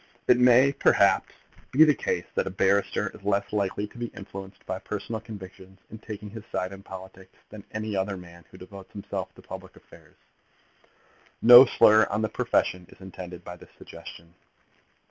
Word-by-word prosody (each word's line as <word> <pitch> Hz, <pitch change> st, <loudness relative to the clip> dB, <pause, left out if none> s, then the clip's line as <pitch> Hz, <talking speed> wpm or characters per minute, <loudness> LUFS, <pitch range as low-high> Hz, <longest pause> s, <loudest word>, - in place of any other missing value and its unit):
It 125 Hz, -, +5 dB
may, 125 Hz, +2 st, +6 dB
perhaps, -, -, +3 dB, 0.4 s
be 145 Hz, +5 st, +6 dB
the 155 Hz, -1 st, +5 dB
case -, -, -3 dB
that -, -, -1 dB
a -, -, -1 dB
barrister 95 Hz, +1 st, +1 dB
is -, -, -14 dB
less 100 Hz, 0 st, -1 dB
likely 100 Hz, 0 st, -1 dB
to 120 Hz, -, -14 dB
be 120 Hz, -, -3 dB
influenced 95 Hz, 0 st, -10 dB
by 95 Hz, -, -4 dB
personal 105 Hz, +2 st, -5 dB
convictions 95 Hz, -3 st, -12 dB
in 110 Hz, -, -9 dB
taking 105 Hz, -2 st, -9 dB
his 110 Hz, -1 st, -9 dB
side 90 Hz, +1 st, -3 dB
in 95 Hz, -, -11 dB
politics 95 Hz, -1 st, -12 dB
than 105 Hz, -2 st, -10 dB
any 110 Hz, -1 st, -4 dB
other 95 Hz, 0 st, -2 dB
man 85 Hz, -1 st, -14 dB
who -, -, -15 dB
devotes 95 Hz, +1 st, -12 dB
himself 100 Hz, -, -5 dB
to -, -, -16 dB
public -, -, -10 dB
affairs. -, -, -19 dB, 1.2 s
No 120 Hz, +2 st, +10 dB
slur 110 Hz, -2 st, +5 dB
on 105 Hz, +2 st, -1 dB
the 110 Hz, -, 0 dB
profession 90 Hz, -2 st, -1 dB
is -, -, -18 dB
intended 90 Hz, -2 st, -10 dB
by 90 Hz, 0 st, -9 dB
this -, -, -16 dB
suggestion. 85 Hz, 0 st, -12 dB
100 Hz, 175 wpm, -26 LUFS, 95-110 Hz, 1.2 s, No